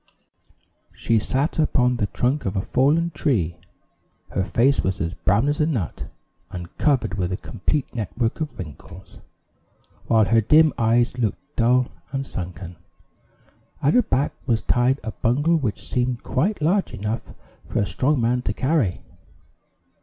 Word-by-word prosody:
She 115 Hz, -1 st, +1 dB
sat 135 Hz, +9 st, -1 dB
upon 125 Hz, -5 st, +2 dB
the 105 Hz, -, 0 dB
trunk 130 Hz, +8 st, -1 dB
of 95 Hz, -, -2 dB
a 95 Hz, -, +1 dB
fallen 155 Hz, -, +2 dB
tree; 110 Hz, -, 0 dB, 0.7 s
her 95 Hz, -, 0 dB
face 130 Hz, +8 st, +2 dB
was 95 Hz, 0 st, -2 dB
as 85 Hz, +1 st, -2 dB
brown 105 Hz, +8 st, +1 dB
as 145 Hz, 0 st, 0 dB
a 150 Hz, -, +3 dB
nut, 115 Hz, -, -3 dB, 0.4 s
and 85 Hz, -2 st, -8 dB
covered 130 Hz, -8 st, +1 dB
with 90 Hz, 0 st, -1 dB
a 95 Hz, -, -1 dB
complete 120 Hz, +8 st, -2 dB
network 115 Hz, -, -2 dB
of 145 Hz, -6 st, -4 dB
wrinkles, 90 Hz, +2 st, -10 dB, 0.9 s
while 110 Hz, -2 st, +4 dB
her 115 Hz, +4 st, +3 dB
dim 155 Hz, +7 st, +5 dB
eyes 120 Hz, +2 st, +2 dB
looked 110 Hz, -5 st, -3 dB
dull 125 Hz, +2 st, +3 dB, 0.2 s
and 135 Hz, 0 st, -2 dB
sunken. 90 Hz, -4 st, -6 dB, 1.1 s
At 145 Hz, -, +4 dB
her 250 Hz, -, +6 dB
back 135 Hz, -, 0 dB
was 115 Hz, -4 st, +1 dB
tied 125 Hz, +3 st, +2 dB
a 110 Hz, -, -4 dB
bundle 145 Hz, +11 st, +1 dB
which 125 Hz, -9 st, -3 dB
seemed 125 Hz, -1 st, -1 dB
quite 170 Hz, +6 st, 0 dB
large 190 Hz, +5 st, +1 dB
enough 105 Hz, +3 st, -4 dB, 0.3 s
for -, -, -4 dB
a 100 Hz, -, +2 dB
strong 135 Hz, +8 st, +1 dB
man 120 Hz, +2 st, +1 dB
to 105 Hz, -, -2 dB
carry. 130 Hz, -, 0 dB
120 Hz, 155 wpm, -23 LUFS, 105-140 Hz, 1.1 s, her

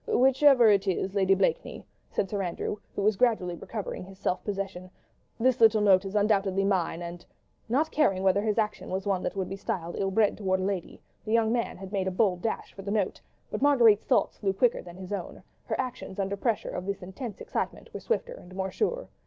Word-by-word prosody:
"Whichever 265 Hz, -, +5 dB
it 200 Hz, -1 st, +2 dB
is, 190 Hz, +1 st, -1 dB
Lady 195 Hz, -1 st, +3 dB
Blakeney," -, -, -1 dB, 0.2 s
said 195 Hz, -, -1 dB
Sir 200 Hz, +1 st, -2 dB
Andrew, 180 Hz, +3 st, -3 dB, 0.2 s
who 200 Hz, -, -1 dB
was 210 Hz, +1 st, +3 dB
gradually 215 Hz, -7 st, +2 dB
recovering 205 Hz, +2 st, -6 dB
his 190 Hz, +1 st, -12 dB
self 185 Hz, -2 st, -1 dB
possession, 195 Hz, -3 st, -4 dB, 0.5 s
"this 255 Hz, +1 st, +2 dB
little 220 Hz, -1 st, +6 dB
note 195 Hz, -2 st, +4 dB
is 195 Hz, +2 st, -5 dB
undoubtedly 200 Hz, -2 st, +2 dB
mine, 175 Hz, -3 st, 0 dB
and.. 175 Hz, 0 st, -7 dB, 0.2 s
." -, -, -40 dB
Not 300 Hz, +7 st, +1 dB
caring 195 Hz, -12 st, +2 dB
whether 195 Hz, +1 st, +3 dB
his 215 Hz, 0 st, 0 dB
action 215 Hz, -1 st, -1 dB
was 190 Hz, +1 st, -3 dB
one 195 Hz, -2 st, 0 dB
that -, -, -3 dB
would 190 Hz, -2 st, -2 dB
be 195 Hz, -, -5 dB
styled 175 Hz, -3 st, -4 dB
ill 195 Hz, -, +1 dB
bred 210 Hz, +1 st, +2 dB
towards 190 Hz, -2 st, 0 dB
a -, -, 0 dB
lady, 195 Hz, -3 st, -4 dB, 0.2 s
the 215 Hz, -, -3 dB
young 225 Hz, -1 st, +3 dB
man 235 Hz, -1 st, -1 dB
had 190 Hz, 0 st, -9 dB
made 190 Hz, -2 st, 0 dB
a -, -, +3 dB
bold 185 Hz, -2 st, +1 dB
dash 225 Hz, -, -3 dB
for 195 Hz, -, -9 dB
the 195 Hz, -, -6 dB
note; 205 Hz, -2 st, -1 dB, 0.3 s
but -, -, -3 dB
Marguerite's 240 Hz, -7 st, +5 dB
thoughts 255 Hz, -, +2 dB
flew 195 Hz, -2 st, 0 dB
quicker 240 Hz, +4 st, +2 dB
than 175 Hz, -1 st, -11 dB
his 185 Hz, +1 st, -7 dB
own; 190 Hz, -4 st, -6 dB, 0.2 s
her -, -, -3 dB
actions, 250 Hz, -7 st, -4 dB
under 195 Hz, 0 st, -1 dB
pressure 220 Hz, 0 st, -1 dB
of 180 Hz, +1 st, -5 dB
this 200 Hz, -1 st, -3 dB
intense 195 Hz, +4 st, -7 dB
excitement, -, -, -4 dB
were -, -, -5 dB
swifter 480 Hz, +1 st, -2 dB
and 185 Hz, -, -13 dB
more 190 Hz, 0 st, -2 dB
sure. -, -, -1 dB
200 Hz, 220 wpm, -28 LUFS, 190-225 Hz, 0.5 s, little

